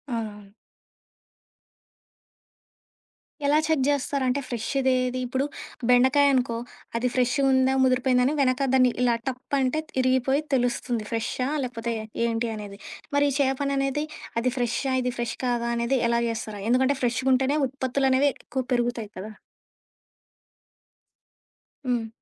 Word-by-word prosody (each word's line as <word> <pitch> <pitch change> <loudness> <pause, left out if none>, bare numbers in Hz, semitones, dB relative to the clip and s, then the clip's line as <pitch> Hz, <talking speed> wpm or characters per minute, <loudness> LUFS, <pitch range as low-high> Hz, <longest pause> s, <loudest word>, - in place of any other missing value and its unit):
అవునవును. 210 -3 -6 2.9
ఎలా 290 +1 +4
చెక్ 315 -5 +2
చేస్తారంటే 280 -1 0
ఫ్రెష్ 230 -2 -3 0.2
దేది? 255 0 +1
ఇప్పుడు 260 +3 -1 0.4
బెండకాయ 260 +3 +5
అనుకో 245 -3 +1 0.4
అది 250 - 0
ఫ్రెష్ 250 -1 +2 0.2
ఉందా 260 0 +3
ముదిరిపోయిందా 255 -1 +3
అని 280 - +2
వెనక 260 +1 +2
దాన్ని 255 -1 +5
ఇలా 240 -2 +3
టప్ 260 +1 -3
అంటే 265 +4 +1 0.2
ఇరిగిపోయి 260 +2 +2
తెలుస్తుంది 245 -2 0
ఫ్రేష్హా? 230 +3 -1
లేకపోతే 235 -2 -3 0.3
ఏంటి 230 0 -1
అనేది. 205 -2 -8 0.4
మరి 285 0 +4
చేపని 275 +1 +1
అనేది 275 +2 0 0.3
అది 250 +2 +1
ఫ్రేష్హా 245 +2 0
ఇది 250 0 -1
ఫ్రెష్ 235 -1 -2
కాదా? 240 -1 0
అనేది 235 +3 +1
ఎలా 235 - +2
జేస్తారు? 220 -3 -4
ఎందుకంటే 260 +3 +3
ఫ్రెష్‌గుంటేనే 260 +3 +2
ఉత్పత్తులనేవి 265 +1 +1
ఎక్కువ 260 -1 -4
పెరుగుతాయి 240 -3 -1
కదా! 205 +4 -6 2.5
హ్మ్. 240 -3 0
255 Hz, 115 wpm, -25 LUFS, 235-265 Hz, 2.9 s, బెండకాయ